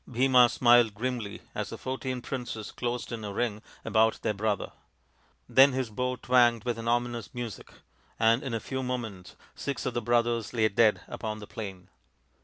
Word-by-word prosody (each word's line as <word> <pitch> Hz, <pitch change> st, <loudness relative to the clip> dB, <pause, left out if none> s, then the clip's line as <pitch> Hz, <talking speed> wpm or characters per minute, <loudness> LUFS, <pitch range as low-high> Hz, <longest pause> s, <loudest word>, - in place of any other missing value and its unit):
Bhima 125 Hz, 0 st, +5 dB
smiled 120 Hz, -3 st, +4 dB
grimly 115 Hz, -3 st, -4 dB
as -, -, -3 dB
the -, -, -7 dB
fourteen 130 Hz, -1 st, -4 dB
princes 120 Hz, -5 st, -5 dB
closed 120 Hz, 0 st, -3 dB
in 115 Hz, -2 st, -5 dB
a 105 Hz, -, -4 dB
ring 105 Hz, 0 st, -2 dB, 0.2 s
about 110 Hz, 0 st, +3 dB
their -, -, +1 dB
brother; 105 Hz, 0 st, -1 dB, 0.8 s
then 135 Hz, +1 st, +6 dB
his 130 Hz, -3 st, -2 dB
bow 125 Hz, +4 st, -1 dB
twanged 120 Hz, -2 st, +3 dB
with 120 Hz, -2 st, -2 dB
an 115 Hz, -, -5 dB
ominous 120 Hz, -1 st, -1 dB
music, 120 Hz, -5 st, -6 dB, 0.5 s
and 115 Hz, +2 st, +4 dB
in 130 Hz, -4 st, -3 dB
a -, -, -1 dB
few 130 Hz, +3 st, -4 dB
moments 115 Hz, -8 st, -5 dB, 0.2 s
six 140 Hz, -1 st, -4 dB
of -, -, -1 dB
the 120 Hz, -, -1 dB
brothers 120 Hz, -1 st, +1 dB
lay 110 Hz, -2 st, +3 dB
dead 105 Hz, +1 st, +3 dB
upon 110 Hz, -1 st, -5 dB
the 105 Hz, -, -9 dB
plain. 95 Hz, -4 st, -8 dB
120 Hz, 175 wpm, -28 LUFS, 110-125 Hz, 0.8 s, then